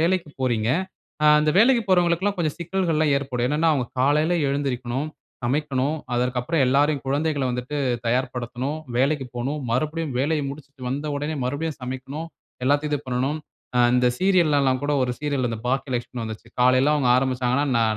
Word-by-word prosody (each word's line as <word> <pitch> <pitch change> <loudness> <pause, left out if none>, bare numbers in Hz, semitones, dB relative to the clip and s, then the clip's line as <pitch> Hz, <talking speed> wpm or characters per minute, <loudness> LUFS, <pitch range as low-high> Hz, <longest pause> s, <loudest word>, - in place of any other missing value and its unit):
வேலைக்கு 170 0 +1
போறீங்க. 120 -4 +1 0.6
ஆ - - +6
அந்த 150 0 +2
வேலைக்கு 235 +1 +5
போறவங்களுக்குல்லாம் 180 +2 +2
கொஞ்சம் 155 -4 -1
சிக்கல்கள் 175 -1 -1
எல்லாம் 155 -2 +3
ஏற்படும். 125 -3 -1
என்னன்னா, 155 +3 +2
அவங்க 125 -4 -1
காலையில 150 +6 +3
எழுந்திருக்கணும். 135 0 -2 0.4
சமைக்கணும், 140 +2 0 0.2
அதற்க்கப்புறம் 125 +5 0
எல்லாரயும், 140 +2 +2
குழந்தைகள 145 0 0
வந்துட்டு 125 +4 -4 0.3
தயார்படுத்தணும். 125 +3 -2 0.2
வேலைக்கு 140 0 +1
போணும். 135 +5 -2
மறுபடியும் 155 +2 -1
வேலைய 150 +2 +1
முடிச்சிட்டு 140 -2 -12
வந்த 145 +3 -3
உடனே 150 +2 -2
மறுபடியும் 145 +3 -3
சமைக்கணும். 135 +5 -5 0.4
எல்லாத்தையும் 145 +2 +2
இது - - 0
பண்ணனும். 130 +4 -1 0.6
இந்த 125 0 +3
சீரியல 175 -7 +3
எல்லாம் 130 -1 +2
கூட 145 - 0
ஒரு 125 - 0
சீரியல் 135 -6 -1
பாக்கியலக்ஷ்மி 125 -2 -2
வந்துச்சு. 110 +1 -7
காலையில 130 +3 +4
அவங்க 135 -4 +1
ஆரம்பிச்சாங்கனா 130 +1 +1
நா 115 - +3
140 Hz, 145 wpm, -24 LUFS, 125-155 Hz, 0.6 s, ஆ